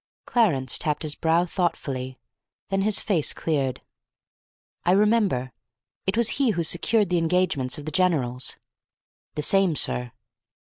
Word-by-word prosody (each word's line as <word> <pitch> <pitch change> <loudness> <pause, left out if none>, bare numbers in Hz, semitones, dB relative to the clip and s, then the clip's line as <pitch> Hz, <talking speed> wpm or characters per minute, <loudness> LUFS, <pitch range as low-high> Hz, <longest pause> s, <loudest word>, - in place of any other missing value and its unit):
Clarence 150 - +1
tapped 150 +1 -2
his 155 -1 +1
brow 165 +3 +1
thoughtfully; 135 -8 -3 0.5
then 195 0 0
his 210 +1 +3
face 175 -8 0
cleared. 140 -5 -2 1.0
"I 175 - +3
remember. 200 - +2 0.6
It 195 +3 0
was 235 -1 +4
he 265 - +3
who 170 - +1
secured 195 +5 +2
the 175 - +2
engagements 165 -6 +1
of 145 - -9
the 155 - -4
generals." 145 -10 0 0.8
"The 150 - -2
same, 195 -1 +3
sir." 125 -3 -1
165 Hz, 135 wpm, -24 LUFS, 135-195 Hz, 1.0 s, was